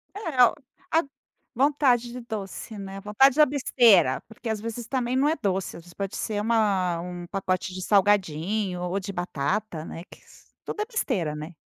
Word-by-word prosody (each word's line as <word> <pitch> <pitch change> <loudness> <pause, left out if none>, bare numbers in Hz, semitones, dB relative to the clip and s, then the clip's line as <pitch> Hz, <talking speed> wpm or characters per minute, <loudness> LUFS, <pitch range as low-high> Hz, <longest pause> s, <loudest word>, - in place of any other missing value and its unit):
É 320 - +2
o - - +2 0.4
a 325 - +4 0.5
vontade 255 -3 +2
de 250 0 -7
doce, 220 -1 -6
né, 195 0 -7
vontade 250 +7 +4
de 305 - +5
a - - +9
besteira, 235 - +4
porque 225 +1 -10
as 220 -1 -1
vezes 230 +1 -5
também 255 -1 -1
não 280 +2 +3
é 320 - +1
doce, 190 -2 -1
as 165 - -12
vezes 175 -1 -15
pode 195 -1 -4
ser 210 -1 -2
uma 200 -6 +1
um 175 0 -7
pacote 185 -1 -2
de 185 - -6
salgadinho 195 -1 +1
ou 180 +2 -1
de 200 +1 -5
batata, 175 +1 -2
né, 165 - -8
que - - -14
s - - -20 0.2
tudo 420 - -4
é - - 0
besteira, 215 - -1
né. 155 +3 -7
205 Hz, 190 wpm, -26 LUFS, 180-245 Hz, 0.5 s, a